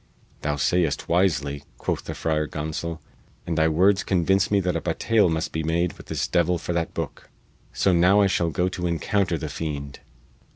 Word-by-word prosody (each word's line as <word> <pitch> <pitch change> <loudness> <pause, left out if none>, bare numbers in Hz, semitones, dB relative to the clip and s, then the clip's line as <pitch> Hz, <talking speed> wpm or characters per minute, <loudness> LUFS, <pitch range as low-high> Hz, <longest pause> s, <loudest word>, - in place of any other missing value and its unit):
"Thou 75 0 -1
sayest 75 +1 +1
wisely," 70 -6 +1
quoth - - -3
the - - -5
Friar 75 -1 0
Gonsol, 80 +2 -4 0.5
"and 85 - -2
thy 80 0 +3
words 95 +5 +3
convince 95 +1 +2
me 100 - +3
that 90 -1 -1
a - - -1
battaile 110 -5 +2
must 80 0 -2
be 80 - -2
made 85 +2 0
with - - -14
this - - -2
devil 90 0 +2
for 85 - -4
that 85 -1 -2
booke. - - -5 0.4
So 95 - +2
now 90 +4 +5
I 100 - +5
shall 90 -3 +1
go 90 +3 0
to 90 -1 -3
encounter 85 +1 0
the 80 - -5
fiend!" 70 -2 -5
85 Hz, 190 wpm, -24 LUFS, 80-90 Hz, 0.5 s, now